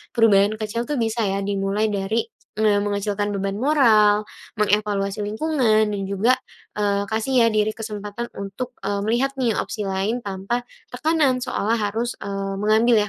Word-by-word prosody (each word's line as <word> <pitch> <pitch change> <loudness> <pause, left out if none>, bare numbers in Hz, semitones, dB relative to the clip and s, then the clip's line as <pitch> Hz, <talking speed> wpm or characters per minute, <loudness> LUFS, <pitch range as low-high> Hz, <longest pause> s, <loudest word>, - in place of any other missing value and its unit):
Perubahan 215 -2 +4
kecil 225 +2 -3
tuh 295 - 0
bisa 225 0 0
ya 195 0 -1
dimulai 200 +1 0
dari, 205 +3 -1 0.3
eee, 210 -2 +3
mengecilkan 205 0 -1
beban 195 0 -2
moral, 215 -8 +4 0.3
mengevaluasi 210 -1 +1
lingkungan, 220 -2 +2
dan 200 - -3
juga, 210 +6 +3 0.4
eee, 200 -1 +1
kasih 230 +2 +2
ya - - +4
diri 215 0 +2
kesempatan 210 0 -5
untuk, 200 +6 -5
eee, 200 +1 -2
melihat 245 +5 +1
nih 240 -4 +1
opsi 210 -2 -3
lain 195 +4 -1
tanpa 200 +5 -3 0.2
tekanan 280 0 +1
seolah 230 -3 0
harus, 225 +3 -2
eee, 195 0 -3
mengambil 220 +3 +3
215 Hz, 145 wpm, -22 LUFS, 200-235 Hz, 0.4 s, Perubahan